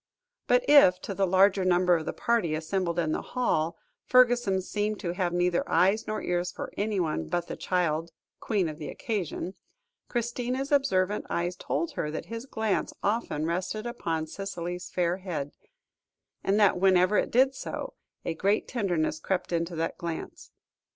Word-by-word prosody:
But -, -, +3 dB
if 230 Hz, -12 st, +7 dB
to 200 Hz, -, -4 dB
the 195 Hz, 0 st, +1 dB
larger 190 Hz, +1 st, +4 dB
number 180 Hz, -1 st, +4 dB
of 160 Hz, -2 st, -3 dB
the -, -, 0 dB
party 225 Hz, -10 st, 0 dB
assembled 170 Hz, +2 st, -2 dB
in 165 Hz, -2 st, +1 dB
the -, -, -1 dB
hall, 170 Hz, -10 st, -1 dB, 0.3 s
Fergusson 240 Hz, -7 st, +4 dB
seemed 210 Hz, +2 st, -2 dB
to 170 Hz, -, -2 dB
have 180 Hz, -1 st, -1 dB
neither 175 Hz, 0 st, +1 dB
eyes 195 Hz, +4 st, +3 dB
nor 215 Hz, -, -3 dB
ears 175 Hz, 0 st, -1 dB
for -, -, -7 dB
anyone 180 Hz, -, -1 dB
but 175 Hz, -, -1 dB
the -, -, -6 dB
child 170 Hz, -3 st, 0 dB, 0.3 s
queen 200 Hz, -6 st, 0 dB
of 155 Hz, 0 st, -6 dB
the 150 Hz, -, -5 dB
occasion, 190 Hz, -3 st, -3 dB, 0.6 s
Christina's 245 Hz, +3 st, -2 dB
observant 210 Hz, -9 st, +2 dB
eyes 175 Hz, +1 st, -1 dB
told 335 Hz, -, -2 dB
her 150 Hz, -, -3 dB
that 155 Hz, -, -5 dB
his 230 Hz, +3 st, -6 dB
glance 220 Hz, -5 st, -1 dB
often 200 Hz, -8 st, 0 dB
rested 185 Hz, +6 st, -2 dB
upon 165 Hz, -10 st, -2 dB
Cicely's 180 Hz, 0 st, -5 dB
fair 175 Hz, 0 st, 0 dB
head, 160 Hz, -7 st, -4 dB, 0.9 s
and 200 Hz, +2 st, +2 dB
that 200 Hz, -3 st, +4 dB
whenever 185 Hz, +1 st, +4 dB
it -, -, -1 dB
did 265 Hz, +3 st, +4 dB
so, -, -, -5 dB, 0.3 s
a 165 Hz, -, -1 dB
great 200 Hz, +6 st, +1 dB
tenderness 175 Hz, -10 st, -1 dB
crept 185 Hz, +2 st, -2 dB
into 170 Hz, +1 st, -1 dB
that 165 Hz, +1 st, -2 dB
glance. 170 Hz, -2 st, -6 dB
185 Hz, 165 wpm, -28 LUFS, 170-215 Hz, 0.9 s, if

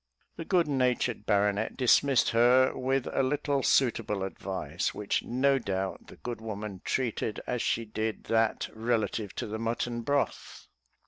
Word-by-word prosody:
The 165 Hz, -, -6 dB
good 175 Hz, -3 st, +2 dB
natured 125 Hz, -5 st, 0 dB
baronet 105 Hz, +1 st, +1 dB
dismissed 130 Hz, 0 st, +4 dB
her 125 Hz, +3 st, +4 dB
with 130 Hz, 0 st, 0 dB
a -, -, +2 dB
little 140 Hz, +1 st, 0 dB
suitable 115 Hz, -7 st, +2 dB
advice, 95 Hz, -3 st, -3 dB
which 105 Hz, -1 st, -1 dB
no 135 Hz, +2 st, +2 dB
doubt 95 Hz, -4 st, -3 dB
the -, -, -12 dB
good 120 Hz, -2 st, -6 dB
woman 105 Hz, -3 st, -6 dB
treated 115 Hz, -4 st, -1 dB
as 125 Hz, -2 st, -2 dB
she 115 Hz, -, 0 dB
did 110 Hz, 0 st, -3 dB
that 115 Hz, -1 st, +1 dB
relative 110 Hz, -2 st, -1 dB
to -, -, -3 dB
the 110 Hz, +1 st, -5 dB
mutton 120 Hz, +1 st, -2 dB
broth. 140 Hz, +4 st, -2 dB
115 Hz, 145 wpm, -29 LUFS, 105-130 Hz, -, dismissed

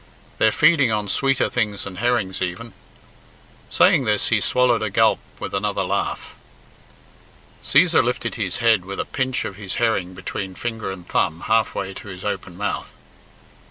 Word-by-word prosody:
They're 110 Hz, -, +4 dB
feeding 150 Hz, -5 st, +4 dB
on 105 Hz, -2 st, -1 dB
sweeter 135 Hz, -1 st, +2 dB
things 105 Hz, -4 st, -1 dB
than 95 Hz, -2 st, -8 dB
herrings 120 Hz, -6 st, 0 dB
even." 95 Hz, +5 st, -4 dB, 1.0 s
Saying 135 Hz, -, +4 dB
this 105 Hz, -2 st, +1 dB
he 110 Hz, -3 st, +2 dB
swallowed 125 Hz, 0 st, +2 dB
a 110 Hz, -, -1 dB
gulp -, -, +3 dB, 0.2 s
with -, -, -6 dB
another 100 Hz, +1 st, -1 dB
laugh. -, -, -3 dB, 1.3 s
Cæsar 165 Hz, +2 st, +4 dB
lifted 125 Hz, +1 st, -2 dB
his 100 Hz, -6 st, -3 dB
head 115 Hz, -5 st, +3 dB
with 100 Hz, +1 st, -7 dB
a -, -, -1 dB
pinch 130 Hz, -2 st, -2 dB
of 95 Hz, -, -6 dB
his 100 Hz, -2 st, -5 dB
herring 95 Hz, -6 st, 0 dB
between 95 Hz, +1 st, -5 dB
finger 115 Hz, -1 st, -4 dB
and 90 Hz, -2 st, -9 dB
thumb 80 Hz, +2 st, 0 dB
half 110 Hz, -1 st, +1 dB
way 95 Hz, -, -3 dB
to 100 Hz, -, -10 dB
his 90 Hz, -2 st, -9 dB
open -, -, -4 dB
mouth. -, -, -3 dB
110 Hz, 160 wpm, -22 LUFS, 95-120 Hz, 1.3 s, They're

